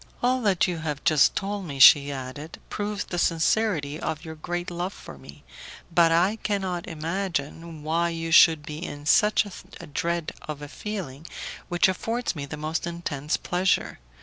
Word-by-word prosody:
"All 250 0 +2 0.2
you 175 -2 -2
have 150 -3 -4
just 150 -3 +4
told 200 0 -3
me," 140 -4 -6
she 140 +1 +8
added, 135 +4 -7
"proves 205 0 -2
the 175 - -4
sincerity 165 -3 +1
of 160 +1 -4
your 160 - -6
great 175 +3 -4
love 175 +3 -3
for - - -11
me, 70 +2 -14 0.5
but 165 -1 +5
I 180 +6 +3
cannot 190 -5 -2
imagine 165 -1 -4
why 165 +2 +1
you 165 0 -4
should 160 -2 +6
be 155 +3 -6
in 145 -2 -7
such 210 +7 +4 0.5
dread 170 +1 -1 0.2
of 150 -1 -6
a - - -6
feeling 165 -5 -6 0.4
which 175 0 +3
affords 225 +4 -2
me 140 -2 -5
the 150 - -6
most 155 +3 -3
intense 155 -4 -2
pleasure. 185 +1 0
165 Hz, 160 wpm, -25 LUFS, 150-185 Hz, 0.5 s, she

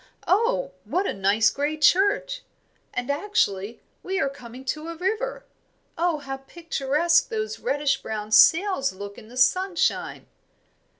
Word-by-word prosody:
Oh, 485 +5 +1
what 370 +3 -1
a - - -1
nice 205 +2 +3
grey 290 +4 -2
church! 405 +10 +3 0.5
And 245 +2 -2
actually, 260 - -1 0.2
we 380 +1 -2
are 275 - +1
coming 255 -1 -11
to 305 +4 -3
a 335 - -5
river. 445 +8 -2 0.5
Oh, 340 -2 +1
how 270 -2 -6
picturesque 305 +2 0
those 435 -2 -3
reddish 290 - 0
brown 215 -1 -5
sails 330 - +5
look 200 +1 -8
in 215 - -15
the 245 +2 -12
sunshine!" 355 +8 +1
305 Hz, 135 wpm, -24 LUFS, 255-385 Hz, 0.5 s, sails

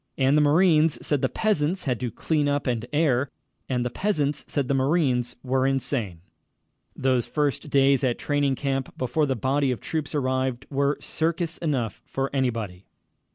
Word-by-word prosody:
And 135 +1 +3
the 150 - +5
marines 155 0 +4
said 145 -3 +1
the 130 - +1
peasants 185 -4 0
had 125 -4 -1
to 125 - -2
clean 150 +4 0
up 145 0 0
and 120 -2 -1
air, 145 -4 +2 0.4
and 125 -2 0
the 125 - -2
peasants 150 -4 -1
said 140 -4 -1
the 140 - +1
marines 130 -3 +1
were 130 0 +1
insane. 125 - -1 0.7
Those 130 -3 +1
first 150 +3 -1
days 140 -1 +4
at 125 -2 +1
training 145 -2 0
camp, 135 -1 -3
before 145 +4 0
the 135 - 0
body 135 +4 +1
of 125 - -1
the - - -16
troops 155 -1 -3
arrived, 130 -2 -1
were 140 +1 +1
circus 165 +1 -2
enough 130 - -2
for 135 +1 -3
anybody. 115 -8 -2
135 Hz, 170 wpm, -25 LUFS, 130-150 Hz, 0.7 s, the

